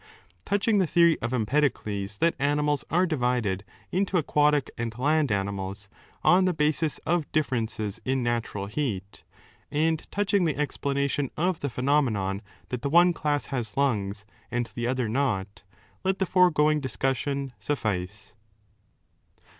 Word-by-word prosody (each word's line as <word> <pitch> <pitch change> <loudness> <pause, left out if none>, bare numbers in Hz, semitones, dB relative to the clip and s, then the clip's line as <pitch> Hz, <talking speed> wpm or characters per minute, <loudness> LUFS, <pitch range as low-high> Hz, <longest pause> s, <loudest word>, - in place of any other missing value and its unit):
Touching 205 +1 +2
the 185 - +2
theory 170 0 +5
of 115 - -2
Empedocles 110 -5 0
that 165 +8 +3
animals 145 0 +1
are 175 +4 +3
9 - - +2
divided 125 - 0 0.3
into 190 0 +1
aquatic 150 -2 +2
and 115 -1 -4
land 145 0 +2
animals 100 0 -3 0.3
on 185 +1 +5
the 180 -2 +1
basis 150 -1 +1
of 170 -2 0
differences 115 -7 -1
in 130 -1 0
natural 115 -4 -2
heat, 105 -4 -4 0.5
and 160 +1 0
touching 200 -1 +1
the 155 -4 0
explanation 140 -1 -1
of 175 +1 +1
the 140 - -2
phenomenon 120 -7 +1 0.3
that 125 -2 -3
the 140 - -1
one 175 +3 +6
class 145 -3 -1
has 115 -4 -3
lungs 105 -7 0 0.2
and 120 -1 -2
the 120 0 -2
other 130 -2 0
not, 105 -5 -1 0.4
let 190 0 +1
the 190 - +1
foregoing 155 -5 +4
discussion 135 0 -2
suffice. 105 -6 -3
140 Hz, 140 wpm, -27 LUFS, 110-155 Hz, 0.5 s, one